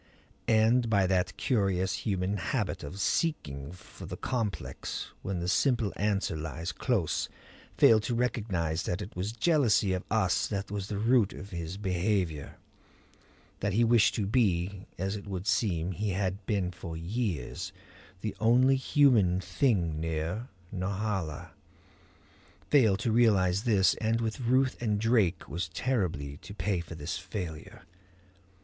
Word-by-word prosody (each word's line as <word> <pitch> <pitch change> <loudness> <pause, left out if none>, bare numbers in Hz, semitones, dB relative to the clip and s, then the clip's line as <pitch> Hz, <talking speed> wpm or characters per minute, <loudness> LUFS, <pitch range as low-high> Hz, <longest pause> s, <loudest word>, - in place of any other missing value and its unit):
And 115 +2 +4
by 100 -3 +3
that 90 -1 0
curious 95 -6 +1
human 95 0 -1
habit 85 - -2
of 75 +7 -7
seeking 75 - -1
for 90 - -12
the - - -6
complex 115 -6 -3
when 95 -1 -3
the 85 0 -3
simple 120 +2 +2
answer 100 -4 0
lies 80 +2 -4
close, 105 - 0 0.5
failed 110 -1 +6
to 120 - -1
recognize 95 -9 -1
that 90 +3 -2
it 100 - -10
was 95 +4 -2
jealousy 120 - +3
of 90 - -2
us - - +2
that 100 0 -4
was 100 -2 -3
the 105 - -3
root 115 -1 +3
of 100 - -9
his 85 +1 -5
behavior; 90 -5 -1 1.0
that 100 0 -1
he 115 +4 +4
wished 115 -2 +4
to 105 - 0
be, 100 -4 0
as 95 +3 -2
it 100 0 -8
would 95 -1 -4
seem 90 -6 +1
he 105 +4 -2
had 95 +1 -1
been 95 -4 0
for 85 -2 -7
years, 90 - -3 0.5
the 105 -2 -3
only 125 +5 +5
human 120 -10 +4
thing 90 - +1
near 80 +8 -2 0.3
Norhala; 95 -4 -3 1.2
failed 115 -9 +5
to 115 - 0
realize 105 -3 +3
this, 100 -6 +4
and 115 +1 +1
with 115 +2 -2
Ruth 130 +1 +1
and 105 -3 0
Drake 110 -5 +2
was 85 +3 -3
terribly 80 - -2
to 100 - -11
pay 100 -4 0
for 85 0 -7
this 80 +4 -4
failure. 90 -4 -7
100 Hz, 145 wpm, -29 LUFS, 90-115 Hz, 1.2 s, failed